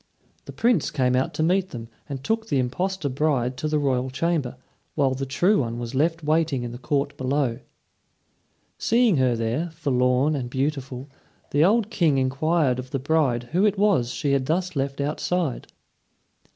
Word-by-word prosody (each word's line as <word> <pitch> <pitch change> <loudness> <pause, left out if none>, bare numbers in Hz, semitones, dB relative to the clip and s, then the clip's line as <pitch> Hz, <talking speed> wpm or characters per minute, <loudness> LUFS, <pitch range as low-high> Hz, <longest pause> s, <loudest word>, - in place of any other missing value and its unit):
The - - -8
Prince 230 - +1
came 130 -3 +1
out 130 +1 +1
to 155 - 0
meet 185 +3 +2
them, 115 -2 -7 0.2
and 135 -2 -5
took 225 +6 -1
the 140 - 0
impostor 180 +7 -1
bride 130 -2 0
to 155 - -2
the 150 0 +1
royal 130 -3 0
chamber, 140 -2 -1 0.4
while 135 -3 +2
the 135 +1 -4
true 180 +10 +2
one 115 -3 -2
was 120 +1 -5
left 160 +4 0
waiting 155 -4 +1
in 120 - -5
the 120 - -8
court 140 +2 -1
below. 130 -2 0 1.2
Seeing 230 -6 +3
her 130 -2 +2
there, 115 +9 -1
forlorn 135 -2 +1
and 125 -3 -3
beautiful, 135 -1 -3 0.4
the 145 +2 +3
old 215 +4 +3
King 160 -9 +2
inquired 135 +1 +1
of 130 0 -7
the 135 - -2
bride 135 -4 0
who 180 +4 +2
it 210 -1 +2
was 195 - +2
she 140 +2 -2
had 135 -2 +1
thus 180 +2 -1
left 140 0 -2
outside. 150 +1 -2
140 Hz, 175 wpm, -24 LUFS, 130-165 Hz, 1.2 s, Seeing